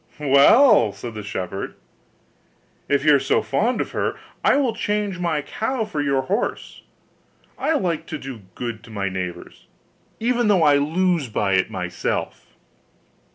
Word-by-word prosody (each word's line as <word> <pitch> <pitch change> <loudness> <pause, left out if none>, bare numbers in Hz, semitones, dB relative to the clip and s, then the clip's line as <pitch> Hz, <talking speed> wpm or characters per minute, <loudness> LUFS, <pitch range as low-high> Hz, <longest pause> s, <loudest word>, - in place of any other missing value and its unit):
'Well,' 145 - +5
said 120 -2 -8
the 105 - -6
shepherd, 95 -1 -5 1.1
'if 140 0 +1
you 150 - +6
are 140 - +5
so 135 - +1
fond 225 - 0
of - - -4
her, - - -1 0.3
I - - +4
will 265 -5 +1
change 205 -3 -2
my 165 -4 -1
cow 225 - -2
for 155 -8 -3
your 140 -2 +1
horse; 200 - -3 0.7
I 320 - 0
like 175 - -1
to 155 - -4
do 130 -5 -8
good 115 -3 -5
to - - -15
my 100 -3 -2
neighbours, 90 -2 -7 0.5
even 240 0 +1
though 195 -5 +4
I 145 -2 +5
lose 165 0 +1
by 100 -2 0
it 95 -1 +2
myself. 90 -1 -4
145 Hz, 155 wpm, -22 LUFS, -, 1.1 s, you